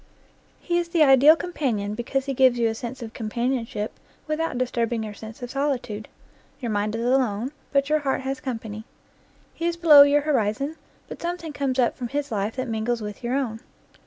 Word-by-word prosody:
He 345 -1 0
is 340 -1 -3
the 335 -2 +4
ideal 280 +2 +7
companion 250 - -2
because 260 +4 -2
he 275 - -2
gives 255 -1 +4
you 235 -1 +2
a 225 - 0
sense 240 +2 -6
of 225 0 -8
companionship 230 -1 -3 0.3
without 310 -3 -2
disturbing 235 -2 -1
your 215 -1 -6
sense 220 +4 -10
of 245 - -5
solitude. 260 -7 -2 0.5
Your 235 -4 -3
mind 210 +1 -1
is 230 +1 -2
alone, 250 -2 +1 0.2
but 275 -1 +2
your 305 +1 +2
heart 275 -2 -1
has 265 0 -3
company. 225 -5 -5 0.7
He 335 - -2
is 340 0 -1
below 315 -4 +9
your 285 +1 +6
horizon, 275 +1 0 0.3
but - - -9
some 345 +1 -2
thing 325 -3 -8
comes 275 -2 -1
up 245 -2 +2
from 245 - -4
his 285 +2 -3
life 210 +1 -1
that 255 0 -3
mingles 225 0 -1
with 210 +3 -7
your 240 +2 -1
own. 240 -5 -2
255 Hz, 195 wpm, -24 LUFS, 225-285 Hz, 0.7 s, below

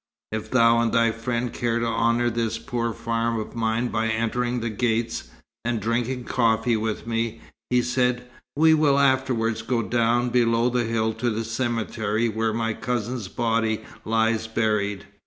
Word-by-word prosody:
"If 110 0 -4
thou 115 -2 +4
and 115 -1 +1
thy 115 0 +3
friend 115 +1 -3
care 120 -1 0
to 120 - 0
honour 115 +1 +1
this 115 -1 -1
poor 115 -1 -2
farm 115 0 -1
of 110 - -7
mine 115 +1 0
by 110 0 0
entering 120 +2 0
the 115 -1 -3
gates, 115 - -1 0.4
and 120 -1 -1
drinking 120 +4 -1
coffee 115 -1 +2
with 110 0 -2
me," 115 0 -2 0.3
he 125 0 +3
said, 125 0 0 0.3
"We 160 +2 +5
will 150 -3 +4
afterwards 130 -5 +2
go 115 0 -1
down 120 +2 +1
below 115 0 +3
the 120 -1 +1
hill 110 -1 0
to 110 +2 -1
the 115 0 -2
cemetery 115 -1 -1
where 110 +1 0
my 115 0 -1
cousin's 120 -2 -3
body 115 +1 0 0.2
lies 110 0 +1
buried. 105 -3 0
115 Hz, 160 wpm, -24 LUFS, 110-120 Hz, 0.4 s, We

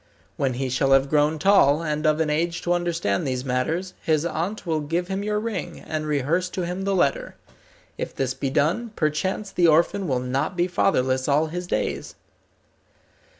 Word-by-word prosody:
When 130 -3 -1
he 130 +1 -2
shall 130 +2 +2
have 135 0 +3
grown 150 +1 +3
tall, 160 -4 +4
and 155 0 -1
of 155 0 +2
an 155 -2 +1
age 170 +3 -1
to 175 - +1
understand 170 - -1
these 130 0 -2
matters, 160 +9 -1
his 155 0 +1
aunt 175 +6 -3
will 160 -2 0
give 170 +5 -2
him 195 +1 -2
your 210 0 -1
ring, 210 -6 -4
and 155 -1 -4
rehearse 155 +5 0
to 180 - 0
him 180 +2 -4
the 195 0 +1
letter. 140 -6 0 0.6
If - - -4
this 130 -2 -1
be 135 - -3
done, 195 - 0
perchance 190 +6 -1
the 175 -1 +3
orphan 170 +5 +3
will 130 -4 +1
not 130 +8 -2
be 175 - +3
fatherless 130 -8 +1
all 150 +2 +3
his 180 0 -4
days." - - -2
160 Hz, 185 wpm, -24 LUFS, 140-180 Hz, 0.6 s, tall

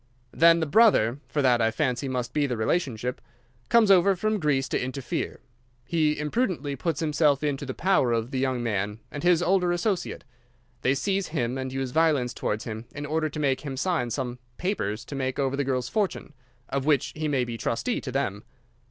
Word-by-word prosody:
"Then 165 +1 +5
the - - +1
brother—for 145 - +3
that, 125 -2 +4
I 115 - +3
fancy, 130 +1 -1
must 125 -1 -3
be 150 -2 +1
the 125 -3 -2
relationship—comes 125 - 0
over 195 +1 +5
from 215 +3 0
Greece 140 -5 +1
to - - 0
interfere. 130 0 -4 0.4
He 155 -3 +1
imprudently 150 - -1
puts 160 +2 -2
himself 150 -2 +2
into 140 -2 -2
the 130 - -4
power 180 -10 +2
of 115 +2 -1
the 130 - -1
young 130 -2 0
man 105 -2 -1
and 145 - -5
his 175 -1 +3
older 180 0 +2
associate. 175 +1 -1 0.6
They 130 +2 +2
seize 195 +5 -1
him 130 -6 -2
and 130 -1 -4
use 135 -1 -3
violence 150 -5 +2
towards 105 +1 -2
him 110 0 -6
in 145 0 -4
order 155 +1 0
to 150 - -6
make 135 -3 +1
him 140 -3 -5
sign 160 -5 0
some 125 -1 -3 0.2
papers 120 - -2
to - - -8
make 130 -1 -2
over 135 -1 0
the 140 - 0
girl's 130 -2 -1
fortune—of 130 - -4
which 145 -2 +1
he 155 0 -2
may 135 -4 +1
be 120 -1 -5
trustee—to 130 - -2
them. 105 -7 -2
140 Hz, 185 wpm, -26 LUFS, 125-160 Hz, 0.6 s, Then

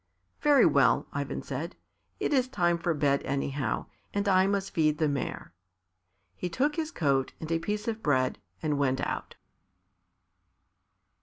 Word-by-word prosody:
"Very 295 -2 +6
well," - - +4
Ivan - - -3
said; - - -5 0.4
"it's 260 -3 +2
time 175 -9 +1
for 170 -1 0
bed, 140 -1 +2
anyhow, 135 -3 -2 0.3
and 200 0 0
I 190 -1 +5
must 195 -1 -1
feed 155 -2 +2
the 155 - +2
mare." 140 -10 -3 0.8
He 180 - -3
took 285 - 0
his 315 -2 -2
coat 140 - 0
and 160 0 -6
a 165 - +2
piece 210 +6 -3
of 225 -1 -2
bread, 130 - +1 0.2
and 150 -2 0
went 130 -2 +1
out. - - -3
165 Hz, 145 wpm, -29 LUFS, 140-205 Hz, 0.8 s, Very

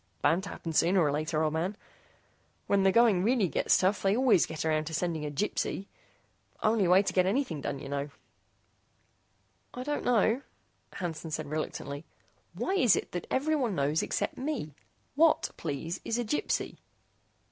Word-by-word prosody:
"Bound 170 +3 +3
to - - -6
happen 165 - -6
sooner 175 +4 +3
or 150 -4 +3
later, 155 +2 -1
old 155 -1 0
man. 180 +6 -2 0.9
When 200 -1 +2
the 195 0 +4
going 225 -4 +4
really 225 -2 +2
gets - - +2
tough 190 +2 +1
they 195 +2 +2
always 250 -9 +4
get 160 0 -5
around 155 -1 +1
to 160 +1 -4
sending 165 -3 -2
a - - -3
Gypsy. 195 +4 -2 0.8
Only 215 -3 +3
way 185 +3 +6
to - - -2
get 185 -1 +3
anything 195 - -1
done, 140 - -3
you 135 - -8
know." 140 +1 -3 1.7
"I 250 - -4
don't 295 +2 -2
know," 235 +1 +2 0.5
Hansen 165 -3 -5
said 155 0 -3
reluctantly. 145 -1 -4 0.5
"Why 380 - -1
is 250 - +5
it - - -4
that 175 - -5
everyone 270 -6 0
knows 145 +3 +1
except - - -2
me? 260 - -3 0.4
What, 315 +2 +3
please, 165 +3 -4
is 230 - -1
a 240 - -1
Gypsy?" 260 +8 -1
180 Hz, 170 wpm, -29 LUFS, 155-230 Hz, 1.7 s, way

